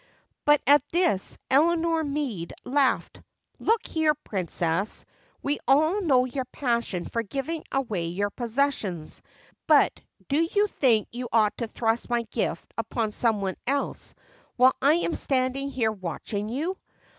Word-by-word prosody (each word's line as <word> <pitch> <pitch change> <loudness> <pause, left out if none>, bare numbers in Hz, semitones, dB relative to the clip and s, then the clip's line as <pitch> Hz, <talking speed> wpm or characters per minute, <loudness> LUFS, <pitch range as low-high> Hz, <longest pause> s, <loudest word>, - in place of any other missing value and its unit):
But 295 0 +5
at 290 +3 +7
this 340 - +1
Eleanor 330 +3 +3
Meade 280 - -3
laughed. 270 0 +1 0.4
"Look 450 0 +1
here, 315 -2 +1
Princess, 185 - -2 0.4
we 290 +1 0
all 315 +9 +4
know 260 -8 +3
your 255 +1 -3
passion 235 - -2
for 230 - -2
giving 275 +8 -4
away 225 -11 -1
your 200 +4 -2
possessions, 230 - -2 0.5
but - - +5 0.3
do 285 +3 +2
you 410 +1 +5
think 245 - +2
you 245 0 -5
ought 215 -2 +3
to 235 - -2
thrust 225 +2 -1
my 240 -1 +1
gift 230 - -2
upon 225 -1 -1
some 220 -1 +1
one 190 -1 -2
else 280 +1 -2 0.4
while 255 +1 +6
I 285 +3 +5
am 340 0 0
standing 270 0 0
here 235 -5 0
watching 205 +2 -4
you? 320 +10 -2
255 Hz, 140 wpm, -26 LUFS, 215-290 Hz, 0.5 s, at